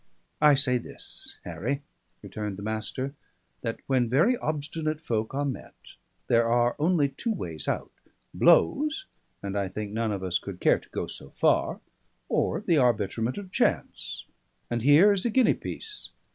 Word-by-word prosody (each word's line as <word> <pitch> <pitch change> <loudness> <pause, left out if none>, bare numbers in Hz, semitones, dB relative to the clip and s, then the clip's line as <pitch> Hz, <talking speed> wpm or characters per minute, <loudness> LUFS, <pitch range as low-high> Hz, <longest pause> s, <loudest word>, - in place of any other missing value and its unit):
"I 150 -2 +7
say 125 -2 +3
this, - - -7
Harry," 110 - -3 0.4
returned 105 -3 -5
the 100 - -7
Master, 110 +5 -3 0.5
"that 115 -1 -3
when 125 -3 +2
very 165 - +4
obstinate 155 -3 -2
folk 115 -5 -2
are 145 +1 0
met, 135 -3 -5 0.5
there 115 0 +3
are 120 +1 +3
only 155 -2 +3
two 180 - -3
ways 80 - -4
out: - - -2 0.4
Blows 300 - +4 0.4
and 100 0 -3
I 100 -1 0
think 105 +2 -5
none 110 0 0
of 100 -2 -3
us 90 -1 0
could - - -8
care - - +4
to - - -21
go - - -3
so - - -8
far; - - +1 0.5
or - - +1
the 165 -3 +3
arbitrament 115 -1 +1
of 195 -2 -7
chance - - -1 0.5
and 120 0 0
here 150 - +7
is 195 -1 +1
a 240 - +1
guinea 255 +2 +4
piece. 425 -2 -5
130 Hz, 160 wpm, -27 LUFS, 110-160 Hz, 0.5 s, I